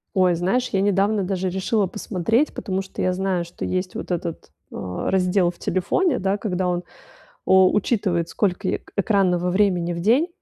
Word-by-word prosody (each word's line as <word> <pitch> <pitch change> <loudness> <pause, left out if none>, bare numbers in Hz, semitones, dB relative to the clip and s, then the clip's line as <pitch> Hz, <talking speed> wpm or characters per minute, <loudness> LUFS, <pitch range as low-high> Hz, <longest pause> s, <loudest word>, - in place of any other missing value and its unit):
Ой, 185 -2 +4
знаешь, 195 +9 0
я 195 - 0
недавно 200 +1 +2
даже 190 0 -1
решила 190 +2 0
посмотреть, 215 - 0
потому 190 -2 -3
что 190 - -7
я 185 - +1
знаю, 185 -1 -1
что 170 - -7
есть 185 0 -2
вот - - -5
этот, 170 - -4 0.2
э, - - -10 0.3
раздел 185 -1 +2
в 175 - -9
телефоне, 255 - 0
да, 195 +1 0
когда 185 -4 -2
он, 175 0 -1 0.6
о 190 0 +5
учитывает 190 -5 0
сколько 190 -4 -1
й - - -1 0.2
экранного 185 -3 +2
времени 180 -3 +1
в 170 - -4
день. 245 - +3
190 Hz, 175 wpm, -22 LUFS, 180-200 Hz, 0.6 s, о